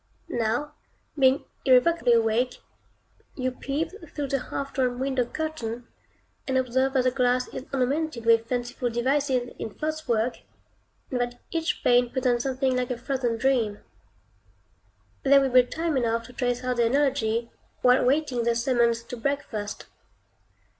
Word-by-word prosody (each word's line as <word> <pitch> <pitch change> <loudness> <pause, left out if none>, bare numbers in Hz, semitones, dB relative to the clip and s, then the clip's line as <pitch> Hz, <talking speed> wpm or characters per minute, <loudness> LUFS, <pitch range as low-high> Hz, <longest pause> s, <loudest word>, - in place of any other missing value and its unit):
Now, 240 +6 -1 0.4
being 270 -1 +3 0.2
irrevocably 255 0 +4
awake, 230 +2 +2 0.8
you 255 -1 -1
peep 280 +5 -3 0.2
through 285 -2 -4
the 275 -1 -2
half 275 0 -4
drawn 250 -2 0
window 260 -1 0
curtain, 245 -5 -4 0.6
and 265 -1 +1
observe 260 +1 +1
that 260 -2 +3
the 255 - +2
glass 250 -1 +1
is 260 - -7
ornamented 275 -1 -1
with 230 0 +4
fanciful 245 0 -2
devices 255 +1 0
in 220 - -6
frostwork, 280 -7 -1 0.7
and 250 -2 0
that 245 0 -3
each 330 -1 -1
pane 245 0 +4
presents 250 -1 0
something 260 -1 0
like 250 -1 -1
a 250 - -2
frozen 245 -2 -1
dream. 230 -4 +1 1.4
There 275 0 +6
will 270 -1 +1
be 255 0 +8
time 320 +5 -2
enough 230 -2 0
to 250 - -13
trace 245 0 -1
out 250 -1 -1
the 235 -1 +3
analogy, 235 -4 +1 0.3
while 250 +1 +5
waiting 265 -2 +1
the 235 0 +1
summons 235 -1 +2
to 240 - -7
breakfast. 230 -6 -3
250 Hz, 145 wpm, -26 LUFS, 240-275 Hz, 1.4 s, be